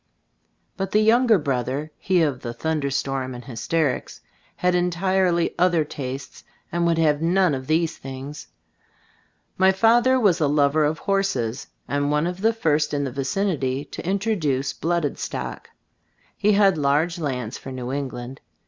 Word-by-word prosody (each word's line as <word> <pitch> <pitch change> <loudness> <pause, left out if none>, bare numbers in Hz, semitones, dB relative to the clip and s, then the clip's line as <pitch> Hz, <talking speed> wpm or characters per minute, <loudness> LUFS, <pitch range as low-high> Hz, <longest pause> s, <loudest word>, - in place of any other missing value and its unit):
But 195 -1 -2
the 210 - +5
younger 225 +1 +5
brother 135 0 -2
(he 185 -3 +2
of 140 -5 0
the 120 -1 -5
thunder 155 +1 -1
storm 135 -1 -2
and 120 - -10
hysterics) 140 +4 -2 0.4
had 180 0 +1
entirely 180 0 +1
other 175 -3 +3
tastes, 135 -1 -7 0.3
and 170 0 +1
would 165 -1 +2
have 150 -2 +2
none 180 0 +3
of 130 -1 -4
these 165 +1 +1
things. 135 +2 -8 1.1
My 190 0 +6
father 235 +6 +4
was 185 -7 +3
a 150 - +3
lover 145 +1 +3
of 155 +1 0
horses, 135 - -1 0.2
and 145 0 0
one 150 +2 +1
of 180 +2 -4
the 225 +2 +4
first 150 -9 0
in 145 - 0
the 135 - -3
vi 135 +2 -3
cinity 145 -6 -1
to - - -6
introduce 180 -9 0
blooded 170 -3 -1
stock. - - -5 0.7
He 210 +1 +2
had 195 -5 +4
large 150 +5 +1
lands, 125 -6 -3
for 135 - -8
New 125 -1 -5
England. 130 -2 -5
155 Hz, 155 wpm, -23 LUFS, 135-185 Hz, 1.1 s, My